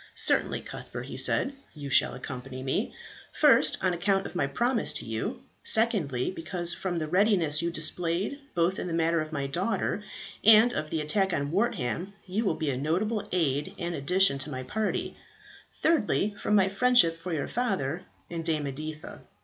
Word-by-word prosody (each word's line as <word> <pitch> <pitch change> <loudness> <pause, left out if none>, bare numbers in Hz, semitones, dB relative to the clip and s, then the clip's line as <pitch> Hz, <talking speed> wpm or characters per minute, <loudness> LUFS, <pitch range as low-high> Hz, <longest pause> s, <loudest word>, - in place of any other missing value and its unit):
"Certainly, - - +1
Cuthbert," - - -8
he - - -8
said, 275 - +3 0.2
"you 140 -2 -7
shall 130 0 +4
accompany 130 0 -7
me; 135 - -1 0.4
first, - - +5
on 185 -1 +2
account 195 +2 +1
of - - -7
my 175 -6 0
promise 235 - +1
to - - -4
you; 110 -1 -4 0.2
secondly, 185 - +2
because 175 0 -2
from 180 -2 -3
the 160 - -1
readiness 180 -4 +2
you 170 - 0
displayed 170 - -1 0.2
both 175 +2 +1
in - - -3
the 165 - -2
matter 165 0 +2
of 155 0 -6
my 140 -3 -2
daughter 190 +7 -1 0.4
and 225 +3 +7
of 155 -6 -3
the 160 - -1
attack 190 +5 +1
on 145 0 -1
Wortham, 185 - -1
you 200 +5 -2
will 175 - +1
be 155 -3 -1
a 125 - -3
notable 190 - -1
aid 165 +1 0
and 175 -1 -3
addition 170 0 +2
to 135 - -1
my 130 -2 -5
party; 215 +11 -2 0.6
thirdly, 215 -9 +1
from 210 - 0
my 195 -2 +5
friendship 195 -5 +3
for 180 +2 -6
your 155 -3 -2
father 185 - -1 0.3
and 170 -1 -5
Dame 155 -3 0
Editha." 155 +3 -6
170 Hz, 175 wpm, -28 LUFS, 150-200 Hz, 0.6 s, and